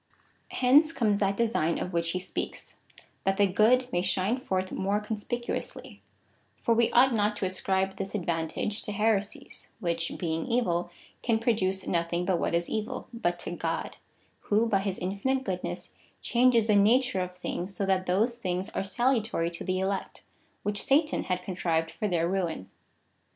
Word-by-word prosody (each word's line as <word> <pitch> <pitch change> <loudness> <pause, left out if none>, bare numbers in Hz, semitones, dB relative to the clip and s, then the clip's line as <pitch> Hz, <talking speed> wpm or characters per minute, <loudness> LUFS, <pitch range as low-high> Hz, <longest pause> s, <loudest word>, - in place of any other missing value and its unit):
^ - - -44 0.5
Hence 285 +5 +5
comes 215 -9 +1
that 195 0 +1
design 220 -8 +1
of 180 - -4
which 170 0 0
he 185 - -1
speaks 185 +1 -5 0.2
— - - -30
that 195 0 +1
the 205 -1 +5
cjood 250 +5 +4
may 175 - +1
shine 190 +6 +1
forth 190 -6 -2
more 200 +2 0
conspicu 220 +3 -3
ously; - - -7 0.6
for 230 - +2
we 230 0 +3
ought 255 +1 +5
not 210 -1 +1
to 195 - -1
ascribe 190 +1 0
this 195 +1 -4
advantage 170 +3 -2
to 210 - -5
he7^e 210 -1 +3 0.2
sies, - - -7
which, 170 -2 -1
being 165 -2 -2
evil, 175 -8 +1 0.3
can 230 -2 +2
produce 195 -5 0
nothing 170 0 0
but 180 -2 +1
what - - 0
is 170 0 0
evil, 215 0 -4
but 175 -7 -1
to 175 - -5
God, 165 -1 -3 0.5
who, 215 +3 +3
bj 200 -4 +2
his 195 -1 -2
infinite 200 +9 -1
goodness, 185 -5 -4 0.3
changes 240 -2 +4
the 215 -2 +3
nature 225 +1 +4
of 180 0 -5
things, 180 +1 -4
so 195 - -1
that 190 -1 +1
those 225 +7 +1
things 185 0 -2
are - - -2
salutary 220 -5 +1
to 170 - -7
the 185 0 -1
elect, 190 +1 -3 0.4
which 205 0 0
Satan 300 +3 +2
had 180 -1 -2
contrived 165 -3 -1
for 210 - -2
their 170 -3 +1
ruin. 175 - -2
195 Hz, 175 wpm, -28 LUFS, 180-225 Hz, 0.6 s, Hence